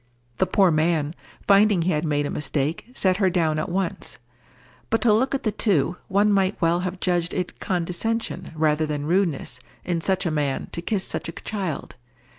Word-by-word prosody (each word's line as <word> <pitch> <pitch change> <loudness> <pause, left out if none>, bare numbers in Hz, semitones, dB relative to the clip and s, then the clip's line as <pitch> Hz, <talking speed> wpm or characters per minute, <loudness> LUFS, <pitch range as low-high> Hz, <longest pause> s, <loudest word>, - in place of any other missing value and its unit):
The - - +3
poor 190 -3 +4
man, 155 -1 +1 0.3
finding 200 -3 +5
he 185 - +1
had 150 -1 0
made 145 -1 +1
a - - -3
mistake, 150 +4 -2
set 185 -7 +1
her 195 -2 +3
down 160 -4 +1
at 155 - -3
once. 180 -7 -3 0.7
But 225 - +2
to 225 -3 +5
look 260 +6 +2
at 270 - -3
the 215 - +1
two, 185 -6 +2
one 205 +2 +3
might 195 0 +1
well 170 +1 +2
have 185 0 -4
judged 175 -2 0
it 180 -2 -3
condescension 185 +6 -2
rather 155 0 +2
than 145 -1 -3
rudeness 165 -8 0 0.3
in 170 -2 -1
such 190 +2 0
a 170 - +1
man 145 -3 -1
to 170 - -4
kiss 190 +2 -1
such - - -4
a - - -6
child. 185 -9 -4
175 Hz, 190 wpm, -24 LUFS, 155-195 Hz, 0.7 s, finding